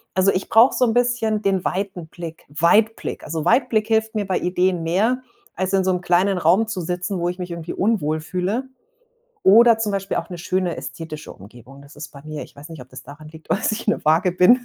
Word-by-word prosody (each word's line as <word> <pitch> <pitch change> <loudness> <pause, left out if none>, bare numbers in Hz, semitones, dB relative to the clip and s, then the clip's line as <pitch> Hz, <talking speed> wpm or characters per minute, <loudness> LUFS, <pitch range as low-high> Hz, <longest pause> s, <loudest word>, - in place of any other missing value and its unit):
Also, 190 +1 +4
ich 185 - -2
brauche 230 +4 +5
so 250 - +3
'n 225 - +1
bisschen 240 -3 +1
den 195 -2 0
weiten 190 -3 -3
Blick 165 0 -9
Weitblick. 170 +10 +1
Also, 160 0 -4
Weitblick 230 -4 +2
hilft 220 0 +1
mir 205 -2 -2
bei 185 - 0
Ideen 180 -1 0
mehr, 220 +10 +1 0.3
als 185 +1 -2
in 190 -1 +3
so 190 - +1
'nem 180 0 -1
kleinen 180 +2 +2
Raum 180 +7 +3
zu 190 -4 -4
sitzen, 180 +3 -3
wo 175 0 -1
ich 180 +1 -6
mich 180 0 -5
irgendwie 170 -1 -6
unwohl 185 -7 0
fühle. 185 +10 -2 0.8
Oder 230 +3 +7
zum 210 -2 -1
Beispiel 195 -1 -2
auch 170 - -4
'ne 175 - -7
schöne, 180 -1 -1
ästhetische 155 -2 -8
Umgebung. 120 +7 -15
Das 140 +1 -16
ist 150 +1 -8
bei 140 0 -14
mir 155 -1 -6
ich - - -14
weiß 150 +4 -12
nicht, 155 -6 -9
ob 125 - -17
das - - -12
daran 150 +3 -12
liegt, 160 0 -15
dass 215 - 0
ich 215 +2 -4
'ne 210 - 0
Waage 165 +4 +3
bin. 185 +8 +5
180 Hz, 225 wpm, -21 LUFS, 165-215 Hz, 0.8 s, Oder